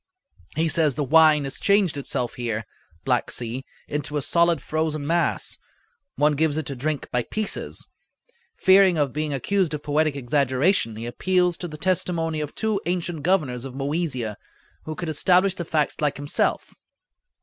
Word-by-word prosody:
He 160 Hz, +1 st, +1 dB
says 155 Hz, -3 st, +3 dB
the 150 Hz, -, -1 dB
wine 155 Hz, +1 st, +5 dB
has 135 Hz, 0 st, -3 dB
changed 200 Hz, -5 st, +3 dB
itself 130 Hz, -3 st, -2 dB
here 115 Hz, -2 st, -3 dB, 0.4 s
(Black -, -, +1 dB
Sea) 120 Hz, +2 st, -4 dB, 0.2 s
into 150 Hz, 0 st, -3 dB
a -, -, 0 dB
solid 170 Hz, 0 st, +3 dB
frozen 155 Hz, -1 st, -2 dB
mass; 170 Hz, +3 st, 0 dB, 0.6 s
one 150 Hz, +1 st, +3 dB
gives 155 Hz, 0 st, +1 dB
it 155 Hz, -, -2 dB
to 140 Hz, -, -5 dB
drink 145 Hz, +2 st, -2 dB
by 125 Hz, -, +1 dB
pieces. 215 Hz, -, -4 dB, 0.7 s
Fearing 190 Hz, -2 st, +5 dB
of 145 Hz, -4 st, 0 dB
being 150 Hz, +1 st, -2 dB
accused 160 Hz, +4 st, 0 dB
of 150 Hz, -, -8 dB
poetic 150 Hz, 0 st, +1 dB
exaggeration 135 Hz, -, +1 dB
he 115 Hz, +2 st, -6 dB
appeals 180 Hz, +8 st, +1 dB
to 175 Hz, -, -5 dB
the 155 Hz, -2 st, -9 dB
testimony 165 Hz, -3 st, 0 dB
of 150 Hz, -, -6 dB
two 220 Hz, -2 st, -1 dB
ancient 175 Hz, -3 st, -2 dB
governors 145 Hz, -8 st, +1 dB
of 135 Hz, -1 st, -8 dB
Moesia, 135 Hz, -6 st, -2 dB, 0.5 s
who 155 Hz, -, -5 dB
could 175 Hz, -, -5 dB
establish 180 Hz, +5 st, +3 dB
the 175 Hz, -3 st, -6 dB
facts 155 Hz, -2 st, -1 dB
like 145 Hz, -2 st, 0 dB
himself. 145 Hz, +1 st, -1 dB
155 Hz, 160 wpm, -24 LUFS, 140-170 Hz, 0.7 s, wine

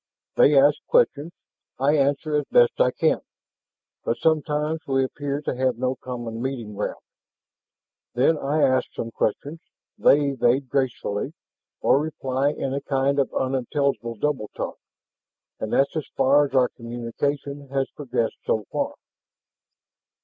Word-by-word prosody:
They 145 Hz, 0 st, +5 dB
ask 145 Hz, +2 st, +5 dB
questions, 170 Hz, -, +2 dB, 0.5 s
I 140 Hz, +3 st, +3 dB
answer 145 Hz, +2 st, +1 dB
as 145 Hz, -1 st, +1 dB
best 120 Hz, 0 st, +4 dB
I 125 Hz, -, +5 dB
can, 160 Hz, +5 st, +1 dB, 0.8 s
but 115 Hz, -, -1 dB
sometimes 155 Hz, 0 st, +1 dB
we 135 Hz, -1 st, +2 dB
appear 140 Hz, +2 st, -3 dB
to -, -, -2 dB
have 130 Hz, -2 st, 0 dB
no 130 Hz, +1 st, 0 dB
common 120 Hz, -2 st, -6 dB
meeting 125 Hz, -5 st, -4 dB
ground. 105 Hz, +1 st, -4 dB, 1.1 s
Then 135 Hz, +6 st, +4 dB
I 150 Hz, +1 st, 0 dB
ask 130 Hz, -1 st, +2 dB
some 115 Hz, -, -5 dB
questions, 145 Hz, +9 st, -2 dB, 0.4 s
they 145 Hz, 0 st, +5 dB
evade 130 Hz, +1 st, +1 dB
gracefully, 130 Hz, -1 st, -1 dB, 0.5 s
or 135 Hz, -, +4 dB
reply 135 Hz, -3 st, -1 dB
in 135 Hz, -2 st, -3 dB
a 140 Hz, -, -2 dB
kind 140 Hz, 0 st, +1 dB
of 135 Hz, -, +1 dB
unintelligible 130 Hz, -2 st, -1 dB
double 130 Hz, -2 st, -1 dB
talk, -, -, -5 dB, 0.8 s
and 110 Hz, -, -4 dB
that's 140 Hz, +3 st, +2 dB
as 155 Hz, -4 st, -3 dB
far 145 Hz, +2 st, +5 dB
as 135 Hz, -, -8 dB
our 125 Hz, -1 st, +4 dB
communication 140 Hz, +4 st, -4 dB
has 135 Hz, 0 st, 0 dB
progressed 120 Hz, -5 st, -2 dB
so 110 Hz, -2 st, 0 dB
far." -, -, -2 dB
135 Hz, 140 wpm, -24 LUFS, 125-145 Hz, 1.1 s, They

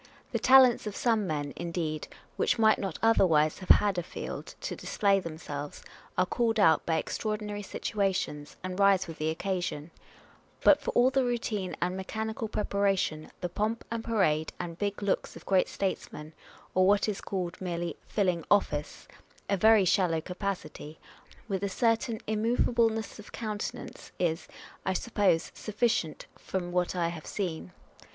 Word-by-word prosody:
1 -, -, -23 dB, 0.2 s
The -, -, 0 dB
talents 255 Hz, -4 st, +6 dB
of 205 Hz, -, -4 dB
some 225 Hz, -5 st, +1 dB
men, 145 Hz, -3 st, -2 dB
indeed, 165 Hz, -3 st, -3 dB, 0.3 s
which -, -, +1 dB
might 220 Hz, -1 st, +4 dB
not 190 Hz, -6 st, -3 dB
otherwise 165 Hz, -9 st, +4 dB
have 185 Hz, -, -10 dB
had 200 Hz, -3 st, +5 dB
a -, -, 0 dB
field 170 Hz, -, -7 dB
to -, -, -3 dB
display 200 Hz, -1 st, +1 dB
themselves, 150 Hz, -4 st, -6 dB, 0.3 s
are 185 Hz, -, +4 dB
called 225 Hz, +3 st, 0 dB
out 160 Hz, -6 st, +5 dB
by 160 Hz, -1 st, +2 dB
extraordinary 210 Hz, +4 st, -3 dB
situa 200 Hz, -1 st, -1 dB
tions, 150 Hz, -5 st, -4 dB
and 185 Hz, +1 st, -4 dB
rise 200 Hz, -2 st, +5 dB
with 165 Hz, -, -9 dB
the 155 Hz, +1 st, 0 dB
occasion; 170 Hz, -3 st, -3 dB, 0.7 s
but -, -, +6 dB
for -, -, -3 dB
all 250 Hz, +2 st, +5 dB
the 265 Hz, 0 st, +2 dB
routine 230 Hz, -6 st, -2 dB
and 180 Hz, +1 st, -1 dB
mechanical 220 Hz, +4 st, -3 dB
preparation, 200 Hz, -7 st, 0 dB
the 180 Hz, -, -1 dB
pomp 215 Hz, +5 st, -2 dB
and 230 Hz, -1 st, -2 dB
parade 160 Hz, -10 st, +1 dB
and 170 Hz, -1 st, -5 dB
big 205 Hz, 0 st, -2 dB
looks 200 Hz, -, -1 dB
of -, -, -12 dB
great 190 Hz, -1 st, +3 dB
statesmen, 155 Hz, -5 st, -4 dB, 0.4 s
or 185 Hz, 0 st, +4 dB
what 205 Hz, +2 st, +4 dB
is 210 Hz, -2 st, -2 dB
called 180 Hz, -3 st, -4 dB
merely 175 Hz, -2 st, -3 dB
filling 180 Hz, -5 st, 0 dB
office, 150 Hz, -8 st, +1 dB, 0.4 s
a 200 Hz, -, +3 dB
very 215 Hz, +1 st, +5 dB
shallow 180 Hz, -3 st, +2 dB
capacity, 180 Hz, -4 st, -5 dB, 0.5 s
with 195 Hz, -3 st, -2 dB
a 200 Hz, -, 0 dB
certain 230 Hz, +2 st, +1 dB
immov 220 Hz, +3 st, +1 dB
ableness 225 Hz, -2 st, 0 dB
of 210 Hz, -, -11 dB
countenance, 215 Hz, -2 st, -5 dB
is, 165 Hz, -2 st, -1 dB, 0.4 s
I 190 Hz, -, 0 dB
should 185 Hz, -, -2 dB
suppose, 200 Hz, -7 st, +1 dB
sufficient, 215 Hz, -7 st, -1 dB
from 180 Hz, -2 st, -4 dB
what 180 Hz, 0 st, 0 dB
I 170 Hz, -2 st, +1 dB
have 165 Hz, -2 st, -8 dB
seen. 160 Hz, -, -4 dB
190 Hz, 160 wpm, -29 LUFS, 170-215 Hz, 0.7 s, talents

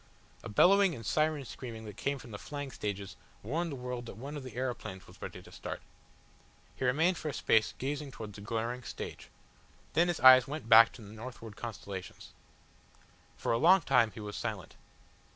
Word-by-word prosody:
A -, -, -7 dB
bellowing 190 Hz, -, +5 dB
and 115 Hz, -, -9 dB
siren 155 Hz, +4 st, +1 dB
screaming 115 Hz, -3 st, -8 dB
that 105 Hz, -2 st, -8 dB
came 140 Hz, +5 st, -1 dB
from 120 Hz, -3 st, -12 dB
the 100 Hz, -, -7 dB
flying 145 Hz, -2 st, -6 dB
stages 100 Hz, -5 st, -4 dB, 0.3 s
warned 160 Hz, -, -2 dB
the -, -, -4 dB
world 125 Hz, -1 st, -5 dB
that 100 Hz, -, -9 dB
one 140 Hz, +6 st, -7 dB
of 145 Hz, -, -5 dB
the 130 Hz, -2 st, -9 dB
aeroplanes 125 Hz, -7 st, -4 dB
was -, -, -17 dB
ready -, -, -7 dB
to -, -, -15 dB
start. -, -, -6 dB, 1.0 s
He -, -, -5 dB
remained 160 Hz, +8 st, +3 dB
for 155 Hz, -, -3 dB
a -, -, -4 dB
space 110 Hz, -3 st, +2 dB
gazing 145 Hz, +2 st, -3 dB
towards 110 Hz, -4 st, -8 dB
the 100 Hz, -, -10 dB
glaring 115 Hz, +3 st, -2 dB
stage. -, -, -7 dB, 0.6 s
Then 170 Hz, +3 st, +4 dB
his 175 Hz, -, -1 dB
eyes 130 Hz, 0 st, +9 dB
went 150 Hz, -3 st, -5 dB
back 115 Hz, 0 st, +9 dB
to 115 Hz, -, -12 dB
the 105 Hz, +1 st, -11 dB
northward 115 Hz, -1 st, -9 dB
constellations. 100 Hz, -5 st, -7 dB, 1.1 s
For -, -, -1 dB
a 115 Hz, -, +2 dB
long 180 Hz, +6 st, +7 dB
time 125 Hz, -6 st, +4 dB
he 110 Hz, -, -11 dB
was 105 Hz, -1 st, -6 dB
silent. 105 Hz, -6 st, -5 dB
125 Hz, 190 wpm, -32 LUFS, 110-145 Hz, 1.1 s, eyes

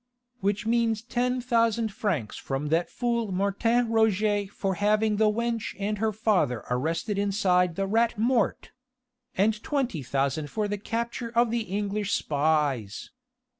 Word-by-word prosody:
"Which 205 Hz, +2 st, -1 dB
means 225 Hz, -1 st, +1 dB
ten 250 Hz, +1 st, -1 dB
thousand 230 Hz, -3 st, +1 dB
francs 165 Hz, -, -2 dB
from 135 Hz, +2 st, -3 dB
that 165 Hz, +2 st, +1 dB
fool 235 Hz, -4 st, -1 dB
Martin 200 Hz, +6 st, +1 dB
Roget 215 Hz, -2 st, +2 dB
for 195 Hz, 0 st, -2 dB
having 210 Hz, +2 st, +2 dB
the 215 Hz, 0 st, +4 dB
wench 230 Hz, 0 st, -2 dB
and 205 Hz, +1 st, -2 dB
her 220 Hz, 0 st, +1 dB
father 200 Hz, -, +1 dB
arrested 165 Hz, -, -1 dB
inside 185 Hz, -4 st, +2 dB
the 195 Hz, -, -1 dB
Rat 225 Hz, +3 st, +1 dB
Mort! 230 Hz, 0 st, +1 dB, 0.7 s
and 210 Hz, +3 st, +2 dB
twenty 265 Hz, -, -1 dB
thousand 140 Hz, +3 st, -1 dB
for 215 Hz, +4 st, -1 dB
the 205 Hz, 0 st, -3 dB
capture 235 Hz, +2 st, -3 dB
of 235 Hz, 0 st, +2 dB
the 230 Hz, -1 st, -1 dB
English 205 Hz, +1 st, -2 dB
spies.... 145 Hz, -8 st, 0 dB
210 Hz, 140 wpm, -27 LUFS, 180-230 Hz, 0.7 s, the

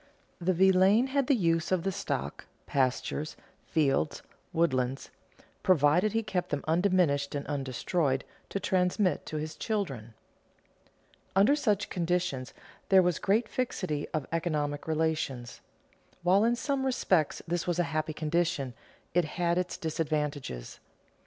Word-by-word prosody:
The 185 Hz, +1 st, +1 dB
villein 190 Hz, +7 st, +5 dB
had 280 Hz, -3 st, +2 dB
the 280 Hz, -, +4 dB
use 165 Hz, -6 st, +1 dB
of 185 Hz, -3 st, +2 dB
the 195 Hz, -, 0 dB
stock, 125 Hz, -, -4 dB, 0.2 s
pastures, 135 Hz, +3 st, -1 dB, 0.3 s
fields, 150 Hz, -1 st, +1 dB, 0.3 s
woodlands, 135 Hz, -5 st, 0 dB, 0.5 s
provided 175 Hz, +3 st, +4 dB
he 225 Hz, 0 st, +1 dB
kept 185 Hz, -4 st, -2 dB
them 145 Hz, -1 st, -2 dB
undiminished 165 Hz, -5 st, +2 dB
and 140 Hz, -, -3 dB
undestroyed 135 Hz, +1 st, -1 dB, 0.3 s
to 200 Hz, -, -2 dB
transmit 185 Hz, -2 st, +1 dB
to 155 Hz, -, -4 dB
his 155 Hz, +1 st, -4 dB
children. 135 Hz, -, -3 dB, 1.2 s
Under 205 Hz, +9 st, +5 dB
such 210 Hz, -9 st, 0 dB
conditions 175 Hz, -7 st, -1 dB, 0.4 s
there 190 Hz, -1 st, +7 dB
was 175 Hz, -2 st, +1 dB
great 215 Hz, +5 st, +2 dB
fixity 185 Hz, -, -2 dB
of 155 Hz, -3 st, -2 dB
economic 150 Hz, -3 st, -1 dB
relations. 155 Hz, -6 st, -1 dB, 0.6 s
While 190 Hz, +4 st, +4 dB
in 235 Hz, +1 st, +3 dB
some 275 Hz, +2 st, -1 dB
respects 185 Hz, -, +1 dB
this 175 Hz, +1 st, -1 dB
was 175 Hz, -1 st, 0 dB
a 175 Hz, -, +3 dB
happy 155 Hz, 0 st, -1 dB
condition, 155 Hz, -4 st, -1 dB, 0.4 s
it 175 Hz, -1 st, +3 dB
had 170 Hz, +2 st, 0 dB
its 180 Hz, 0 st, -3 dB
disadvantages. 150 Hz, -, -3 dB
165 Hz, 130 wpm, -29 LUFS, 145-190 Hz, 1.2 s, there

